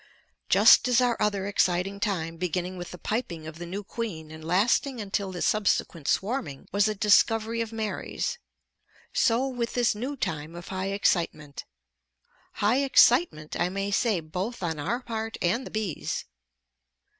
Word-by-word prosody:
Just - - +7
as 250 -1 +4
our 245 -2 +2
other 200 -2 +1
exciting 195 0 0
time 165 -6 -2
beginning 180 +1 -2
with 175 -1 -7
the 180 - -9
piping 180 -7 -3
of 160 +1 -9
the 175 - -6
new 195 +4 -5
queen 190 -8 -5
and 160 0 -10
lasting 220 - +1
until 200 -2 -2
the 180 -2 -4
subsequent 190 -7 0
swarming 205 - -1
was 200 +1 +3
a 215 - -1
discovery 225 +3 +3
of 225 -1 -4
Mary's, 220 - -3 0.7
so 240 +3 +2
with 245 -3 -3
this 245 -2 +3
new 255 +7 -4
time 155 - -3
of 175 0 -9
high 190 0 -3
excitement; 165 -7 -1 0.9
high 215 +5 +2
excitement 245 - +4
I 175 - +2
may 195 +2 -3
say 205 -3 +1
both 185 +8 -5
on 160 -3 -2
our 220 - -2
part 225 -2 -4
and 230 +9 0
the - - -10
bees'. 210 -8 -3
200 Hz, 155 wpm, -27 LUFS, 175-230 Hz, 0.9 s, Just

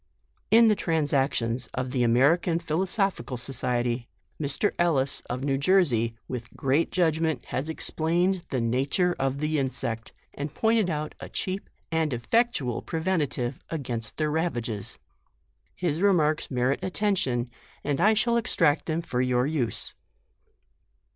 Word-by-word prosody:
In 230 +1 +7
the 215 - +5
transactions 135 -8 0
of 130 0 -2
the 125 - 0
American 140 +9 +3
Philo 170 +2 -1
140 195 - 0
JUNE. 125 +1 -6
sophical - - -3
Society, 120 -1 -1 0.3
Mr. 145 +8 +1
Ellis, 145 -6 +2
of 125 +2 -3
New 135 -1 0
Jersey 140 - +3
t 115 - -21
with 120 -2 -6
great 140 +5 +1
judgment, 160 -5 +1
has 140 +5 -2
explained 170 +3 0
the 130 - -1
na 120 +3 +1
ture 180 +1 +2
of 135 0 0
the 150 +1 0
insect, 115 -4 -2 0.2
and 145 0 -5
pointed 220 -4 +2
out 155 -1 -3
a - - -8
cheap 190 +1 -3 0.2
and 160 -3 +1
effectual 130 - 0
preventive 155 -7 -1
against 120 -8 -4
their 155 -1 0
rava 160 -5 0
ges. 110 -3 -5 0.8
His 170 -2 -1
remarks 160 -7 +2
merit 130 +1 +1
attention, 175 - 0 0.3
and 145 -1 -1
I 215 +2 +5
shall 235 +2 +2
extract 155 -9 +2
them 165 +1 -1
for 125 -6 -1
your 125 -1 +2
use. 140 -6 -1
145 Hz, 145 wpm, -27 LUFS, 125-175 Hz, 0.8 s, In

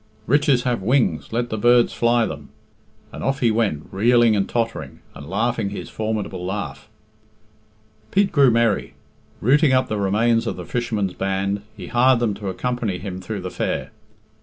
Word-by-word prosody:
'Riches 140 -1 +3
have 120 -4 -1
wings;' 125 +6 +1
let 120 +1 -2
the 110 - -2
birds 120 +1 +4
fly 120 0 +2
then," 75 -5 -7 0.6
and - - -8
off 135 0 0
he 120 -3 +3
went, 105 -10 -1
reeling 115 +2 +4
and 100 -1 0
tottering, 115 -1 -3 0.2
and 70 +2 -10
laughing 110 +1 0
his 100 - -7
formidable 110 -4 -3
laugh. 100 +3 -5 1.2
Pete 200 0 +2
grew 140 -5 +5
merry. 115 -3 +1 0.5
Rooting 140 +4 +4
up 130 0 +2
the 105 - -2
remains 115 +4 +2
of - - -2
the - - -8
fishermen's 110 -6 -2
band, 95 +1 -1 0.2
he - - -7
hired 125 +1 +3
them 115 -3 0
to 100 -1 -5
accompany 115 -1 -2
him 95 -1 -6
through 100 +2 -5
the 90 0 -5
fair. - - -3
115 Hz, 165 wpm, -22 LUFS, 100-120 Hz, 1.2 s, grew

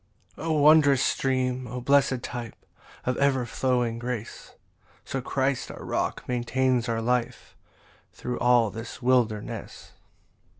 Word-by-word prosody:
18 - - -8
O - - +2
wondrous 150 -3 +5
stream 130 -1 0
O 125 +2 -5
blessed 135 -1 +2
type 120 -2 -7 0.4
Of 125 -1 0
ever 135 -3 +2
flowing 120 -1 0
grace! 120 -2 -6 0.5
So 135 - -3
Christ 135 0 -1
our - - -9
rock - - -2
maintains 125 0 0
our 115 0 -1
life 125 0 -2 0.6
Thro' 125 - -5
all 120 -3 +4
this 115 +4 -8
wilderness. 120 -4 -1
125 Hz, 125 wpm, -26 LUFS, 120-130 Hz, 0.6 s, wondrous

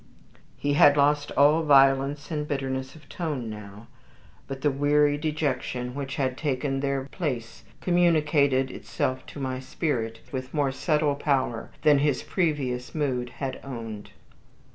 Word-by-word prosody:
He 145 0 0
had 145 0 +6
lost 145 +1 +2
all 150 +3 +5
violence 140 0 +4
and 150 -1 -2
bitterness 135 -1 -3
of 150 -3 -16
tone 145 -10 -4
now; 105 0 -10 0.6
but 135 -1 -6
the 145 - +2
weary 145 +1 +3
dejection 145 -5 -2
which 135 0 -4
had 130 -4 -1
taken 135 -2 -1
their 140 -1 -1
place 125 -11 -4 0.2
communicated 150 -7 +3
itself 130 0 -3
to - - -9
my 130 -1 -3
spirit 120 -5 -2
with 130 +1 -5
more 145 -2 +2
subtle 150 +1 +1
power 135 -5 -1
than 150 -2 +6
his 145 -2 +1
previous 140 -9 -1
mood 130 -5 -1
had 135 -2 -4
owned. 115 -6 -7
140 Hz, 140 wpm, -26 LUFS, 130-150 Hz, 0.6 s, had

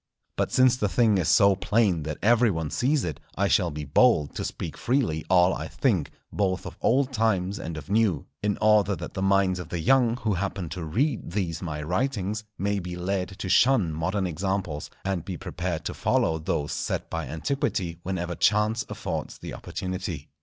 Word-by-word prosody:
But - - -1
since 130 -1 +4
the 105 -4 0
thing 110 -2 +3
is 85 - 0
so 100 -3 +6
plain 100 -3 +2
that 75 - -4
every 120 +2 +5
one 80 -5 -2
sees 130 - +1
it, 80 -5 -4 0.2
I 100 - +1
shall 90 -3 +3
be 75 -1 -5
bold 75 - +3
to - - -4
speak - - -5
freely 120 - 0
all 90 0 +5
I 80 - -4
think, 85 - 0 0.2
both 95 -2 0
of - - -7
old 135 +2 +2
times 105 -4 +1
and 80 -1 -5
of 75 -2 -8
new, 100 -7 +1 0.2
in 105 -1 0
order 105 -2 +4
that - - -7
the 95 - -3
minds 95 -1 +2
of 85 -2 -7
the 85 - -3
young 120 +6 +3
who 110 -4 -1
happen 95 -2 -3
to 90 +1 -5
read 125 - -1
these 90 -5 -2
my 75 -4 -4
writings, 105 - -1
may 100 +1 0
be 90 -1 -6
led 95 +1 -2
to - - -4
shun 105 -4 +4
modern 90 +5 -1
examples, 90 -3 -2 0.2
and 95 -4 -1
be 90 -1 -5
prepared 90 -2 -4
to - - -2
follow 80 0 +1
those 75 -2 -2
set - - -2
by 80 -4 -3
antiquity 85 - -2
whenever 90 -1 -3
chance 105 +6 +2
affords 95 -7 -4
the - - -8
opportunity. 95 -3 -5
95 Hz, 190 wpm, -26 LUFS, 85-105 Hz, 0.2 s, so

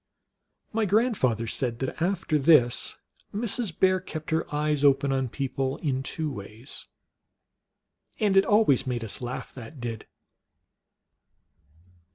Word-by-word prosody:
My 220 0 +1
grandfather 195 - +2
said 115 +1 -2
that 130 +5 -4
after 175 -3 +1
this 135 -5 +4 0.4
Mrs. 220 -4 -1
Bear 185 0 +4
kept 160 -4 -7
her 160 +1 +1
eyes 150 -1 0
open 140 0 +4
on 130 -2 0
people 135 0 -2
in 135 -5 -1
two 155 +3 -3
ways. 110 +2 -8 1.3
And 205 -4 +2
it 195 - +7
always 205 - +3
made 120 -2 -2
us 110 - -5
laugh, 125 +2 -5
that 135 +3 -10
did. 115 -2 -5
140 Hz, 125 wpm, -27 LUFS, 125-185 Hz, 1.3 s, it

